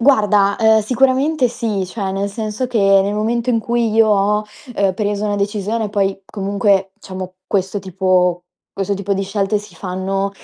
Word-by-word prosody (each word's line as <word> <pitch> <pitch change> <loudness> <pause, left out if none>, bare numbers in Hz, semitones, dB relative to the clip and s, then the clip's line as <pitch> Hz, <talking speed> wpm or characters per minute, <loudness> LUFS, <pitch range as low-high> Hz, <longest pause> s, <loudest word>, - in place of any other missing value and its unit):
Guarda, 210 -6 +3
ehm, 220 -1 +5
sicuramente 260 +5 +2
sì. 215 -5 -2
Cioè, 190 0 -4
nel 200 +1 -1
senso 215 +3 -3
che 245 -3 -1 0.2
nel 200 +1 -2
momento 230 +3 0
in 230 - +2
cui 235 0 0
io 220 0 +4
ho, 210 +1 +2 0.3
uhm, 195 -2 +2
preso 205 0 -1
una 205 -1 0
decisione 210 +2 -1
poi 195 -1 -1
comunque, 195 -1 0
diciamo, 185 -1 -7
questo 195 0 -1
tipo 180 -1 +1 0.3
questo 195 +1 -2
tipo 200 0 -2
di 195 - 0
scelte 200 +1 0
si 210 +1 -13
fanno, 195 +1 -2
205 Hz, 165 wpm, -18 LUFS, 195-220 Hz, 0.3 s, ehm